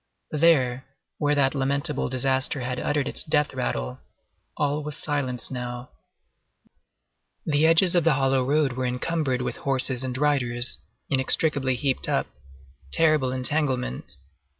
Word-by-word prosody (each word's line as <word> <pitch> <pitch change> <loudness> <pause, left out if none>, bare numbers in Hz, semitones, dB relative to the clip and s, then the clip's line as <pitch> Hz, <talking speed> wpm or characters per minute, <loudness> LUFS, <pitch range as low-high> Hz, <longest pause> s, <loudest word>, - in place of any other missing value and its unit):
There, 135 -5 +2 0.3
where 145 0 +2
that 135 -2 +2
lamentable 140 +2 -1
disaster 130 +1 0
had 125 0 -3
uttered 145 -2 -1
its - - 0
death 150 -2 +1
rattle, 65 - -3 0.6
all 145 0 0
was 150 0 -6
silence 140 -5 0
now. 125 -1 -6 1.5
The 155 0 +3
edges 170 +2 +4
of 175 -2 +3
the 165 - +4
hollow 135 -1 +2
road 140 0 +1
were 130 0 -2
encumbered 130 0 -1
with - - -4
horses 130 -1 -1
and 130 -1 -3
riders, 130 -4 0 0.3
inextricably 135 0 +3
heaped 135 +1 -1
up. - - +1 0.7
Terrible 155 - +3
entanglement! 130 - -1
135 Hz, 125 wpm, -25 LUFS, 125-150 Hz, 1.5 s, edges